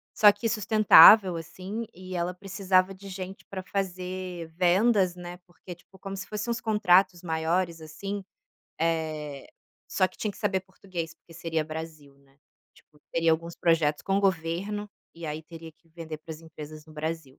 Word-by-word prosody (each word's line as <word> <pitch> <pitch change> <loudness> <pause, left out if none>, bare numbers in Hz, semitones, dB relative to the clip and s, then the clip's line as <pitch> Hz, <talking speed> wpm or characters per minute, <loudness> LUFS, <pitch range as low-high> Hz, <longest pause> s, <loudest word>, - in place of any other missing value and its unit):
só 210 -1 +8
que 220 +3 -3
sustentável, 215 -2 +8
assim, 190 +7 -6
e 185 0 -8
ela 175 +1 -1
precisava 190 0 +1
de 200 +1 -12
gente 190 +1 -7
para 190 -1 -6
fazer 185 -2 -4
vendas, 185 +1 +3
né, 175 0 -8
porque, 180 0 -11
tipo, 190 +2 -21
como 195 +1 -6
se 190 - -5
fosse 210 +2 -4
uns 235 -1 -1
contratos 190 -5 +3
maiores, 165 +1 -1
assim, 195 +6 -6 0.6
eh, 155 -4 -2 0.4
só 185 -1 +1
que - - -21
tinha 215 - -2
que - - -15
saber 195 -3 0
português, 185 -3 -7
porque 165 0 -19
seria 165 -1 -2
Brasil, 155 -2 -8
né. 135 0 -28 0.4
Tipo, 150 - -24
teria 165 0 +3
alguns 165 +1 -1
projetos 160 -3 +2
com 195 - 0
o - - +2
governo 195 +3 -1 0.3
e 165 -1 -7
aí 155 +1 -4
teria 165 0 -11
que 160 +2 -34
vender 160 -1 -7
para 155 +1 -9
as 155 - -11
empresas 155 -1 -10
no 155 - -15
Brasil. 155 -3 -5
175 Hz, 175 wpm, -27 LUFS, 160-195 Hz, 0.6 s, só